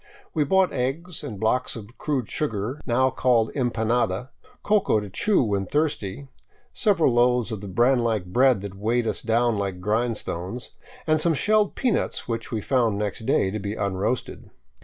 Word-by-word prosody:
We 155 - +2
bought 190 +4 +3
eggs, 145 +7 -3
and 105 -4 -6
blocks 125 +4 0
of 115 +1 -10
crude 135 -7 -1
sugar, 125 0 -3
now 130 +2 +3
called 120 -4 +2
empanada, 120 -2 0 0.3
coca 205 - +3
to 105 -2 -7
chew 205 - +2
when 100 -4 -1
thirsty, 140 - -1 0.5
several 170 - +2
loaves 120 -1 +3
of 110 -3 -4
the 100 - -7
bran 120 +7 +3
like 110 -5 0
bread 125 +3 +3
that 100 -1 -6
weighed 115 +4 0
us 110 - -2
down 115 -1 +1
like 95 -2 -3
grindstones, 110 0 -2 0.3
and 155 -1 +2
some 165 0 +2
shelled 210 +6 +2
peanuts 250 -5 -1
which 115 -1 -4
we 110 -3 -2
found 115 -4 +1
next 105 +2 -3
day 95 - +2
to 110 - -3
be 100 +1 -4
unroasted. 100 +4 -2
120 Hz, 165 wpm, -24 LUFS, 105-135 Hz, 0.5 s, bought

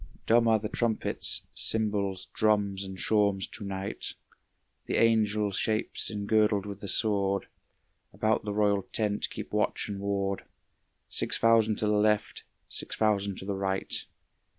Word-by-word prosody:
Dumb 115 +1 +4
are 110 -1 +5
the 105 0 -4
trumpets, 115 0 0
cymbals, 100 -4 0
drums 100 -2 +1
and 95 -1 -7
shawms 100 -2 +2
to 110 - -1
night, 95 0 -4 0.7
The - - -1
angel 105 -2 +2
shapes 110 +3 0
engirdled 105 -1 +1
with 100 -1 -7
the 100 - -7
sword, 100 -1 +2 0.7
About 110 0 0
the 105 - -3
royal 100 -1 +2
tent 105 +1 -1
keep - - -8
watch - - 0
and 100 -1 -4
ward, 100 -1 -2 0.6
Six - - +1
thousand 115 -1 +4
to 105 - 0
the 105 - +2
left, 105 0 0 0.2
six - - -3
thousand 100 -2 +1
to - - -5
the 100 - -2
right. 95 0 -2
105 Hz, 145 wpm, -28 LUFS, 100-110 Hz, 0.7 s, are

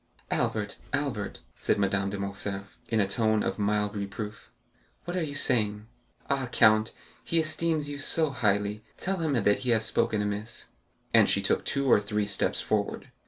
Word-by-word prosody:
"Albert, 105 -2 -1
Albert," 135 -8 -2 0.2
said - - +1
Madame 100 0 +1
de 100 - -4
Morcerf, 100 +1 -5
in 110 - +2
a 100 - +4
tone 110 +1 +2
of - - -2
mild 105 0 +1
reproof, 105 +1 -5 0.6
"what 175 - -3
are 180 - 0
you 145 -3 -3
saying? 105 -7 +1 0.4
Ah, 135 -2 0
count, 110 0 +5 0.3
he 165 - +1
esteems 160 -1 0
you 145 0 -5
so 155 +1 +2
highly, 105 -3 0
tell 195 +1 -1
him 160 -4 0
that 105 -4 +3
he 125 - -3
has 110 -2 +3
spoken 110 0 +1
amiss." 105 +2 -3 0.4
And - - +6
she - - +3
took - - +1
two 140 0 0
or 125 - +6
three 105 0 -1
steps 100 -2 0
forward. - - -2
110 Hz, 170 wpm, -28 LUFS, 100-140 Hz, 0.6 s, And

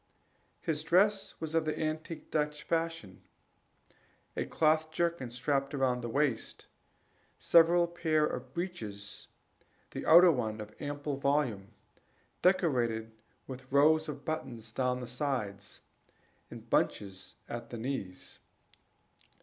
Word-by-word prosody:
His 150 -1 -1
dress 195 +5 +3
was 160 -1 -4
of 165 -1 +3
the 155 - -1
antique 155 +1 -4
Dutch 150 -1 -1
fashion: 165 - -2 1.1
a - - -1
cloth 155 0 +2
jerkin 170 -5 -1
strapped 135 +3 -1
round 130 -2 +1
the 120 - -4
waist, 135 -2 -1 0.7
several 170 +1 +5
pairs 160 -3 +1
of 125 0 -6
breeches, 110 - -5 0.6
the - - -5
outer 175 +2 +9
one 110 -6 -2
of 105 0 -8
ample 145 0 -3
volume, 135 -8 0 0.7
decorated 120 -12 +2 0.3
with 130 0 -9
rows 155 +3 +4
of 145 -1 -7
buttons 120 -8 -4
down 125 +1 0
the 125 - -6
sides, 120 -7 -3 0.7
and - - -10
bunches 95 -2 -1
at 120 0 -6
the 120 - -6
knees. 110 -7 -5
140 Hz, 115 wpm, -31 LUFS, 120-160 Hz, 1.1 s, outer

